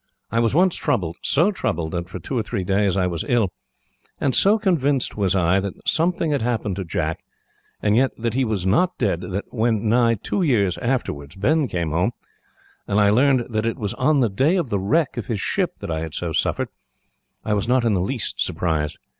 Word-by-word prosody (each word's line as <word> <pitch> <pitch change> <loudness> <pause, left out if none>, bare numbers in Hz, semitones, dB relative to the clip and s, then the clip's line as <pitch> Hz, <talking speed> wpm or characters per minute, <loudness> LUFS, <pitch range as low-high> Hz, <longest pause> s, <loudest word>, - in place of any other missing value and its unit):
I 115 - +1
was 115 +3 +1
once 180 +1 +4
troubled 85 -2 -1
so 170 +9 +3
troubled, 80 - -2
that, 85 0 -4
for 95 - -6
two 110 +9 -5
or 120 - +2
three 105 -2 -3
days, 100 0 +1
I 95 - +2
was 85 -3 -2
ill 115 -7 +2 0.7
and 135 - +1
so 205 +3 +5
convinced 145 - +1
was 100 -3 +1
I 90 +1 +3
that 95 -1 -6
something 170 -1 +1
had 145 - 0
happened 110 -5 -1
to 95 - -2
Jack, 80 -2 -2 0.6
and 105 0 +3
yet 130 +3 +4
that 115 -1 -2
he 130 +2 +1
was 105 -6 -1
not 145 - +2
dead, 95 -7 0
that 95 +2 -5
when, 110 -2 +1
nigh 115 0 +4
two 115 - -2
years 105 - +2
afterwards, 80 - -2
Ben 145 +9 +1
came 85 -7 -2
home, 90 +9 +1 0.7
and 100 - +1
I 100 -1 +5
learned 130 +1 +3
that 110 +1 0
it 115 - -2
was 105 -3 -3
on 140 +2 +2
the 120 - +3
day 135 - +2
of 170 -9 -1
the 100 - +1
wreck 130 - +1
of 115 - -4
his 110 -4 -2
ship - - -1
that - - -4
I 80 - -1
had 80 -1 -5
so 85 -2 -3
suffered, - - 0 0.8
I 105 - 0
was 105 +1 0
not 125 -1 +2
in 115 - +3
the 95 - +1
least 120 +6 -2
surprised. 80 -2 -2
110 Hz, 215 wpm, -22 LUFS, 95-130 Hz, 0.8 s, so